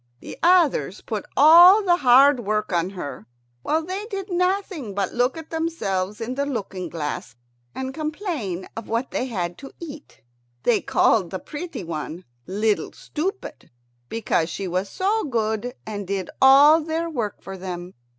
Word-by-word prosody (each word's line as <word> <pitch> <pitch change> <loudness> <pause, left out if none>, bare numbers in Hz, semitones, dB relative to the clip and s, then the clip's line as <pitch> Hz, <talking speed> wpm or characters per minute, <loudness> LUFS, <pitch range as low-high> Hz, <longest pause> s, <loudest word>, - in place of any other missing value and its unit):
The - - -9
others 330 - +3
put 215 -3 -5
all 345 +8 +8
the 350 -2 +3
hard 270 0 +6
work 215 -2 -2
on 170 +1 +1
her, 145 - -7 0.3
while 315 - 0
they 385 +4 -4
did 395 -2 -5
nothing 360 - -1
but 200 - -1
look 245 +4 +1
at 320 -1 -10
themselves 210 - -2
in 235 +2 -3
the 280 +2 -1
looking 195 -8 -4
glass 150 -6 -5 0.4
and 265 0 -4
complain 305 - -4
of 225 - -7
what 230 +3 -1
they 255 - -2
had 175 -7 -4
to 275 - -10
eat. 305 -3 -10 0.4
They 235 - +3
called 195 -7 +2
the 190 - -4
pretty 305 - -7
one 165 +1 -6 0.2
"Little 210 +2 0
Stupid," 380 +6 -5 0.4
because 200 -7 0
she 195 +3 -4
was 185 +3 -2
so 410 - 0
good 225 -2 -2
and 205 -3 -5
did 195 -2 -3
all 285 +4 +7
their 325 +2 -2
work 235 - -4
for 195 - -7
them. 180 -1 -7
240 Hz, 160 wpm, -23 LUFS, 195-320 Hz, 0.4 s, all